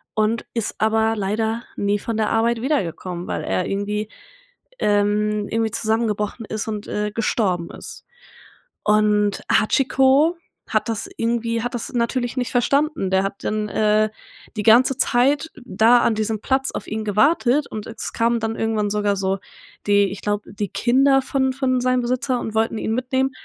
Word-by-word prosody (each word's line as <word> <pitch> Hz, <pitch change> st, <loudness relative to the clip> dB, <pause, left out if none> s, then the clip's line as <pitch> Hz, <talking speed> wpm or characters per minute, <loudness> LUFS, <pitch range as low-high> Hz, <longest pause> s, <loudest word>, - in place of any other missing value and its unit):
und 215 Hz, +2 st, 0 dB
ist 230 Hz, -, -2 dB
aber 220 Hz, 0 st, +2 dB
leider 220 Hz, +3 st, -1 dB, 0.2 s
nie 205 Hz, 0 st, 0 dB
von 225 Hz, 0 st, -4 dB
der 215 Hz, -1 st, +1 dB
Arbeit 230 Hz, +1 st, +1 dB
wiedergekommen, 180 Hz, -, -2 dB
weil -, -, -3 dB
er 185 Hz, -, -1 dB
irgendwie, 210 Hz, +2 st, -2 dB, 0.7 s
ähm, 210 Hz, 0 st, +1 dB
irgendwie 225 Hz, -1 st, 0 dB
zusammengebrochen 220 Hz, 0 st, -1 dB
ist 215 Hz, +1 st, -4 dB
und, 210 Hz, -1 st, -4 dB
äh, 210 Hz, 0 st, -2 dB
gestorben 195 Hz, -6 st, -1 dB
ist. -, -, -10 dB, 0.8 s
Und 210 Hz, -1 st, +2 dB
Hachiko 270 Hz, +7 st, +3 dB, 0.3 s
hat 215 Hz, 0 st, 0 dB
das 220 Hz, -2 st, -3 dB
irgendwie 230 Hz, 0 st, -1 dB
hat 245 Hz, +2 st, -3 dB
das 240 Hz, -, -5 dB
natürlich 245 Hz, +1 st, -1 dB
nicht 245 Hz, -, -1 dB
verstanden. 280 Hz, -, +1 dB
Der 190 Hz, 0 st, +3 dB
hat 195 Hz, 0 st, -5 dB
dann, 215 Hz, 0 st, -1 dB
äh, 215 Hz, 0 st, +2 dB, 0.5 s
die 210 Hz, -, -1 dB
ganze 245 Hz, +4 st, +5 dB
Zeit 280 Hz, +6 st, +2 dB
da 240 Hz, +1 st, +4 dB
an 225 Hz, -, +2 dB
diesem 215 Hz, 0 st, -1 dB
Platz 265 Hz, 0 st, 0 dB
auf -, -, -6 dB
ihn 220 Hz, +1 st, -3 dB
gewartet 275 Hz, -, +2 dB
und 215 Hz, -1 st, -6 dB
es 225 Hz, 0 st, -6 dB
kamen 235 Hz, 0 st, +1 dB
dann 225 Hz, 0 st, -2 dB
irgendwann 220 Hz, -2 st, 0 dB
sogar 205 Hz, -1 st, 0 dB
so 190 Hz, 0 st, -1 dB, 0.5 s
die 200 Hz, -1 st, +4 dB
ich 200 Hz, -, -7 dB
glaube, 205 Hz, 0 st, -3 dB
die 205 Hz, -1 st, -3 dB
Kinder 270 Hz, +2 st, +3 dB
von 265 Hz, -1 st, 0 dB
von 255 Hz, -1 st, 0 dB
seinem 255 Hz, 0 st, +2 dB
Besitzer 250 Hz, +1 st, -1 dB
und 220 Hz, -1 st, -5 dB
wollten 225 Hz, 0 st, +1 dB
ihn 220 Hz, -, -2 dB
mitnehmen. 260 Hz, +2 st, 0 dB
220 Hz, 165 wpm, -21 LUFS, 210-245 Hz, 0.8 s, ganze